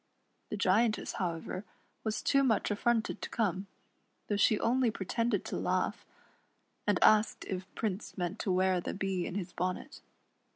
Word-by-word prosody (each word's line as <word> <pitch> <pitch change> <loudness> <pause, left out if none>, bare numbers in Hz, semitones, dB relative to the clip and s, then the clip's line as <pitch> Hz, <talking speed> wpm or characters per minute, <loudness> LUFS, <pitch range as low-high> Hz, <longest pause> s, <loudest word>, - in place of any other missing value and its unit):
The 210 - -3
Giantess, 210 +4 +2
however, 180 +1 -3 0.4
was 220 -1 -2
too 275 -1 +4
much 225 -4 +2
affronted 225 +1 +1
to - - -4
come, 195 -3 -1 0.6
tiiough 205 - +1
she 210 0 +4
only 250 +1 +3
pretended 225 +1 -1
to - - -3
laugh, - - -1 0.8
and - - +4
asked 220 +2 +4
if 185 0 -4
Prince 210 -2 -3
meant 180 +3 -2
to 195 - 0
wear 185 0 +3
the - - -4
Bee 190 -2 -1
in 180 - -5
his 185 -3 -4
bonnet. 180 +1 -3
205 Hz, 155 wpm, -32 LUFS, 185-225 Hz, 0.8 s, too